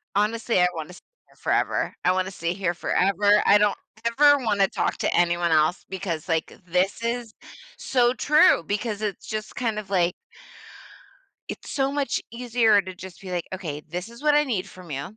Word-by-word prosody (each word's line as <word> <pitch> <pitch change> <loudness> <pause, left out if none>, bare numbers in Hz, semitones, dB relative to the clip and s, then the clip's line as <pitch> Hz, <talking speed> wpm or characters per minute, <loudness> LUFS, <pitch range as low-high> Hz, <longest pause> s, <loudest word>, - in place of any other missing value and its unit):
Honestly, 215 0 +1
I 180 - +5
wanna 160 +1 -7
stay - - -15 0.2
here - - -25
forever, - - 0
I 180 - +5
wanna 185 0 -1
stay 170 -2 -3
here 180 -2 -1
forever, 200 +4 +2
I 205 - +7
don't 210 0 +2 0.3
ever 290 +5 +5
wanna 205 -7 +1
talk - - -1
to - - 0
anyone 175 -1 +2
else 155 +2 +2
because, 180 -3 -4
like, 160 -1 -1
this 185 +5 0
is 235 -1 -3 0.4
so 245 -2 +2
true 290 - +4
because 210 +3 -3
it's 210 -3 -4
just 215 -1 -5
kind 230 -3 -2
of 215 -2 -6
like, 180 -3 +2 1.3
it's - - -8
so 270 0 0
much 280 -3 -1
easier 230 -3 +3
to 185 0 -7
just 185 0 -11
be 190 - -9
like, 175 -2 -2
"Okay, 155 -6 -5
this 180 +5 -5
is 235 - -13
what 300 -1 +4
I 295 - +5
need 225 -10 -2
from 180 -3 -13
you, 145 +9 -6
200 Hz, 185 wpm, -24 LUFS, 180-230 Hz, 1.3 s, I